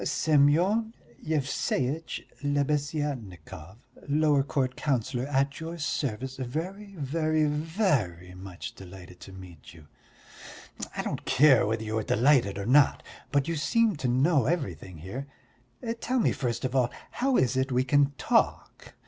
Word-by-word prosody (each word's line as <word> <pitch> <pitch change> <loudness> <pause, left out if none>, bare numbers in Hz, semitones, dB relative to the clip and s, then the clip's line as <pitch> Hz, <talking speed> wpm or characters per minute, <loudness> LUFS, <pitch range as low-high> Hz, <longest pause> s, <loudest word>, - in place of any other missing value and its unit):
"Semyon 170 +10 +2 0.3
Yevseitch 145 0 -1 0.2
Lebeziatnikov, 140 - -3 0.2
lower 150 -1 +3
court 135 -2 -1
councillor, 125 -2 -1
at 140 -1 0
your 165 +1 -6
service, 130 -4 -3
very, 185 +11 -5
very, 155 +1 0
very 150 - -1
much 95 -1 -8
delighted 90 -1 -12
to - - -11
meet 90 -4 -12
you." 80 -2 -15 1.1
"I - - -1
don't - - -4
care 135 -3 +5
whether 110 +1 -1
you 110 0 -2
are - - -3
delighted 115 -3 +3
or 100 - -4
not, 135 +4 +4 0.3
but 140 -1 +1
you 165 - -1
seem 225 +6 +2
to 135 - -2
know 130 +1 +3
everything 95 - -3
here. 100 - -7 0.7
Tell 255 +2 -1
me 230 - +3
first 120 -2 -2
of 130 +1 -3
all 125 -2 +3 0.2
how 260 +1 +1
it 130 0 +2
is 130 0 +1
we 125 +1 +2
can 140 +2 +3
talk? - - 0
135 Hz, 140 wpm, -28 LUFS, 110-155 Hz, 1.1 s, care